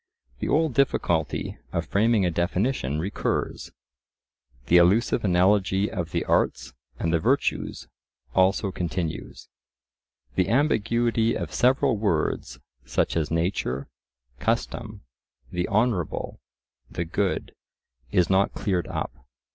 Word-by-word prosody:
The -, -, -2 dB
old 155 Hz, -2 st, +2 dB
difficulty 85 Hz, -, 0 dB
of -, -, -1 dB
framing 105 Hz, -1 st, +2 dB
a 90 Hz, -, +1 dB
definition 85 Hz, -, 0 dB
recurs. 95 Hz, +6 st, -2 dB, 1.0 s
The 90 Hz, -, +5 dB
illusive 100 Hz, +7 st, +4 dB
analogy 95 Hz, +1 st, +3 dB
of 85 Hz, -3 st, -3 dB
the -, -, -2 dB
arts -, -, 0 dB, 0.2 s
and 80 Hz, +3 st, -1 dB
the 85 Hz, -, +3 dB
virtues -, -, 0 dB, 0.5 s
also 95 Hz, +1 st, +3 dB
continues. 85 Hz, -2 st, -4 dB, 0.9 s
The 95 Hz, 0 st, +1 dB
ambiguity 115 Hz, -3 st, +2 dB
of -, -, -5 dB
several 125 Hz, -2 st, +3 dB
words, 100 Hz, -7 st, -1 dB, 0.3 s
such -, -, 0 dB
as 80 Hz, -2 st, 0 dB
nature, 80 Hz, -6 st, -1 dB, 0.5 s
custom, -, -, -2 dB, 0.5 s
the 90 Hz, 0 st, -1 dB
honourable, 105 Hz, -6 st, 0 dB, 0.5 s
the 85 Hz, -, -3 dB
good, 95 Hz, +4 st, -1 dB, 0.6 s
is 90 Hz, -2 st, +3 dB
not 95 Hz, +1 st, +2 dB
cleared 90 Hz, -5 st, -1 dB
up. -, -, -3 dB
95 Hz, 110 wpm, -25 LUFS, 85-110 Hz, 1.0 s, The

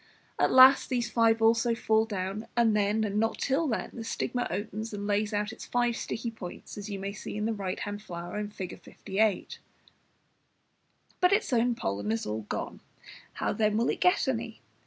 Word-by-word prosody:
At -, -, +3 dB
last 260 Hz, +1 st, +8 dB
these 245 Hz, -3 st, -1 dB
five 225 Hz, -1 st, +3 dB
also 230 Hz, +1 st, +4 dB
fall 220 Hz, -1 st, +2 dB
down, 200 Hz, 0 st, -4 dB
and 225 Hz, -2 st, +4 dB
then, 210 Hz, +1 st, +2 dB
and 210 Hz, -1 st, 0 dB
not 225 Hz, +1 st, 0 dB
till 285 Hz, +4 st, +1 dB
then, 225 Hz, -, -2 dB
the 230 Hz, -, -6 dB
stigma 245 Hz, +2 st, -2 dB
opens 215 Hz, +1 st, -4 dB
and 205 Hz, 0 st, -5 dB
lays 205 Hz, +1 st, 0 dB
out 210 Hz, 0 st, -1 dB
its -, -, -10 dB
five 240 Hz, -1 st, +1 dB
sticky 230 Hz, +1 st, -4 dB
points, 190 Hz, -6 st, -9 dB
as 205 Hz, 0 st, -7 dB
you 200 Hz, -, -3 dB
may 195 Hz, +1 st, -4 dB
see 205 Hz, -, -6 dB
in 210 Hz, -, -1 dB
the 225 Hz, -, 0 dB
right 195 Hz, -2 st, -4 dB
hand 205 Hz, 0 st, -4 dB
flower, 175 Hz, +2 st, -5 dB
Fig. 190 Hz, -3 st, -7 dB
58. 205 Hz, 0 st, -1 dB, 1.6 s
But 360 Hz, +2 st, +4 dB
its 405 Hz, -9 st, +1 dB
own 240 Hz, 0 st, +3 dB
pollen 100 Hz, -, -2 dB
is 115 Hz, -, -1 dB
all 105 Hz, 0 st, -4 dB
gone, -, -, -4 dB, 0.5 s
how -, -, -1 dB
then 215 Hz, 0 st, +1 dB
will 235 Hz, -, +2 dB
it -, -, -2 dB
get 360 Hz, +2 st, +3 dB
any? -, -, -2 dB
215 Hz, 190 wpm, -29 LUFS, 200-230 Hz, 1.6 s, last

